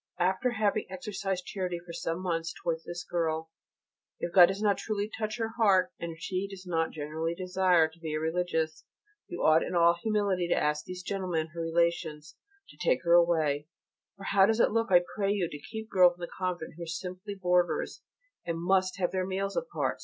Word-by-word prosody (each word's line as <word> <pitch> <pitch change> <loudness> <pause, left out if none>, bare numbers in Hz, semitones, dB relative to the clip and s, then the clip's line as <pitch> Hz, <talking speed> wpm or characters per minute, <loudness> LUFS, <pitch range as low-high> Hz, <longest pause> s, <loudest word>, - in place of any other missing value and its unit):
After 190 +8 +1
having 215 -1 0
exercised 190 0 -4
charity 185 -3 -3
for 170 0 -10
some 170 +1 -3
months 165 -2 -2
towards 165 -1 -1
this 175 0 -6
girl, 160 -2 -2 0.7
if 170 - -4
God 180 -3 +9
does 195 +1 -3
not 205 -1 +2
truly 210 -2 -2
touch 215 0 -3
her 225 -1 -1
heart 190 -4 +4
and 170 0 -4
if - - -14
she 185 +3 -2
does 195 -1 -10
not 165 -2 0
genuinely 160 +2 -3
desire 180 -2 +3
to 160 +1 -19
be 160 -2 -4
a - - 0
Religious, 160 -1 -1 0.4
you 175 - -5
ought 155 +1 +6
in - - -3
all 170 0 +5
humility 205 -5 +1
to - - +2
ask 150 0 0
these 185 0 -7
gentlemen, 180 -5 -2
her 170 - -4
relations, 165 -1 -1 0.3
to - - -16
take - - +1
her 170 - +3
away: 160 -4 +3 0.5
for 200 - -11
how 195 0 +4
does 225 +1 +1
it - - +4
look, 230 0 0
I 175 -1 +7
pray 200 -1 +1
you, 195 -4 0
to 150 - -8
keep 220 0 -6
girls 180 -2 +6
in - - -16
the 175 - -5
convent 180 -3 -3
who - - -10
are - - -13
simply 185 +4 -5
boarders 180 -2 +1 0.4
and 170 -1 -3
must 185 +2 +1
have 180 -2 0
their 185 -1 -1
meals 195 +1 -2
apart? - - -2
180 Hz, 205 wpm, -29 LUFS, 165-195 Hz, 0.7 s, God